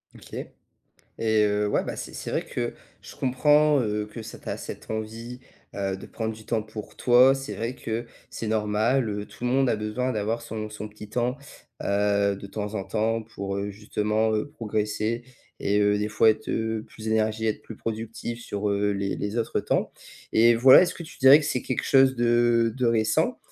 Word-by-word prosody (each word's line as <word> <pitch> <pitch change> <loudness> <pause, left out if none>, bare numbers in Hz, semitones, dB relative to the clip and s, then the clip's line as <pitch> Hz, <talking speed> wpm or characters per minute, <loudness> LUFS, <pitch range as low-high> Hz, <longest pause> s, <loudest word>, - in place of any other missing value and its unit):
OK - - -15 0.9
et 110 -1 +3
heu, 105 0 +1
ouais, - - +1
bah, - - -5
c'est - - -7
c'est - - -5
vrai - - -1
que - - -3 0.3
je - - -11
comprends, 150 +3 +3
heu, 105 -2 -1
que 110 +2 -9
ça - - -9
tu - - -11
as - - -2
cette - - -8
envie, 115 +3 -5 0.3
heu, 95 -1 -2
de - - -10
prendre 110 -1 -4
du 110 0 -13
temps 115 -2 0
pour 110 0 -9
toi. 125 +2 +6
C'est 135 +1 -5
vrai 115 +3 -3
que 115 -1 -4 0.2
c'est 115 - -5
normal, 110 +4 +1
heu, 105 0 -4
tout - - -10
le 125 - +1
monde 135 +1 +3
a - - +2
besoin 110 +5 -2
d'avoir 110 +1 -1
son 110 -2 -6
son 105 0 -7
petit 105 0 -12
temps, 125 +2 0 0.5
heu, 100 0 +2
de 100 - -9
temps 105 +1 -5
en 100 -3 -2
temps, 115 +2 0
pour, 100 -3 -5
heu, 100 +1 -2
justement, 105 +1 0
heu, 110 +6 -1
progresser 110 -2 -2 0.3
et 100 +1 +1
heu, 105 0 +3
des 105 +1 -1
fois 110 +1 +5
être, 110 0 -3
heu, 110 -1 -1
plus 110 0 -8
énergie 110 0 +1
et - - +2
être - - -6
plus 110 - -10
productif 115 +1 -5
sur, 105 -2 -2
heu, 100 0 +1
les 100 0 -2
les 105 +2 -3
autres 115 -1 0
temps - - -1 0.4
et 115 +1 +6
voilà, 130 +6 +8
est-ce 180 -1 0
que - - -8
tu 160 - -12
dirais 135 +1 +9
que 155 - -4
c'est 130 -3 0
quelque 130 - -3
chose 135 -1 +5
de 120 -1 +3
de 130 -1 0
récent 110 -1 +2
110 Hz, 210 wpm, -26 LUFS, 105-120 Hz, 0.9 s, dirais